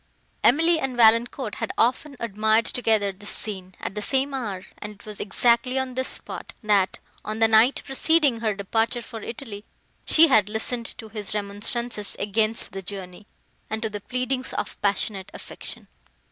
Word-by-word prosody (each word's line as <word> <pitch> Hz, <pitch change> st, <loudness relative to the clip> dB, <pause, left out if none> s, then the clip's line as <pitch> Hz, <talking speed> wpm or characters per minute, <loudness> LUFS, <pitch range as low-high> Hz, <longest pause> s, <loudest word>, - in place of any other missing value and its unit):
Emily 325 Hz, +6 st, +5 dB
and 265 Hz, -4 st, -2 dB
Valancourt 230 Hz, 0 st, +4 dB
had -, -, -1 dB
often 260 Hz, +5 st, +1 dB
admired 220 Hz, 0 st, +2 dB
together 220 Hz, -5 st, +1 dB
this 205 Hz, +2 st, -9 dB
scene, 190 Hz, -4 st, -2 dB
at -, -, -5 dB
the 210 Hz, -, -4 dB
same 270 Hz, +5 st, +1 dB
hour; 205 Hz, -8 st, -4 dB
and 210 Hz, 0 st, -7 dB
it 205 Hz, -, -19 dB
was 210 Hz, -1 st, -7 dB
exactly 235 Hz, +5 st, +2 dB
on 265 Hz, -1 st, -1 dB
this 260 Hz, +1 st, -1 dB
spot, -, -, -4 dB
that, 200 Hz, -3 st, +2 dB, 0.3 s
on 215 Hz, +1 st, -4 dB
the 225 Hz, 0 st, +5 dB
night 220 Hz, +4 st, +4 dB
preceding 285 Hz, -2 st, +2 dB
her 220 Hz, -3 st, 0 dB
departure 225 Hz, +4 st, -1 dB
for 225 Hz, -1 st, -8 dB
Italy, 220 Hz, -3 st, -7 dB, 0.4 s
she 325 Hz, +1 st, +6 dB
had 215 Hz, -8 st, +4 dB
listened 225 Hz, +2 st, -1 dB
to 220 Hz, -, -9 dB
his 210 Hz, -1 st, -4 dB
remonstrances 210 Hz, +2 st, -3 dB
against 215 Hz, +2 st, +1 dB
the 195 Hz, -, -6 dB
journey, 190 Hz, +1 st, -6 dB, 0.4 s
and 220 Hz, +1 st, -3 dB
to 220 Hz, -, -2 dB
the 205 Hz, 0 st, -5 dB
pleadings 255 Hz, +3 st, -3 dB
of -, -, -4 dB
passionate 200 Hz, -1 st, 0 dB
affection. -, -, -8 dB
220 Hz, 165 wpm, -24 LUFS, 205-250 Hz, 0.4 s, she